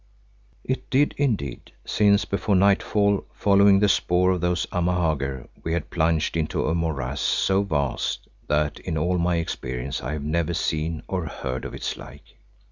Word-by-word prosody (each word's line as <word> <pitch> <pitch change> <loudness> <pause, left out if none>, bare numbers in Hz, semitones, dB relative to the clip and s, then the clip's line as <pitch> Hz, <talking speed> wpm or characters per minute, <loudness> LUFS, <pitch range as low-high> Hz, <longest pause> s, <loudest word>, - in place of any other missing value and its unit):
It 130 - -3
did 140 +3 +3
indeed, 110 - -2
since 100 0 +3
before 100 0 0
nightfall, 100 +1 +3
following 100 0 +5
the 105 - +4
spoor 90 -1 +3
of 90 -2 -1
those 90 0 +1
Amahagger, 80 -7 -1
we 80 - -2
had 85 -3 -3
plunged 80 -1 +1
into 80 -2 -1
a 80 - +1
morass 80 -7 -2
so 95 0 +2
vast 70 -9 -2 0.2
that 75 0 0
in 80 -3 -3
all 90 +3 +1
my 85 +1 +1
experience 70 -4 -3
I - - -4
have 75 -2 -4
never 85 +3 0
seen 80 0 -2
or 90 -3 -2
heard 65 -3 -5
of - - -6
its - - -4
like. 70 +3 -13
85 Hz, 160 wpm, -24 LUFS, 75-95 Hz, 0.2 s, following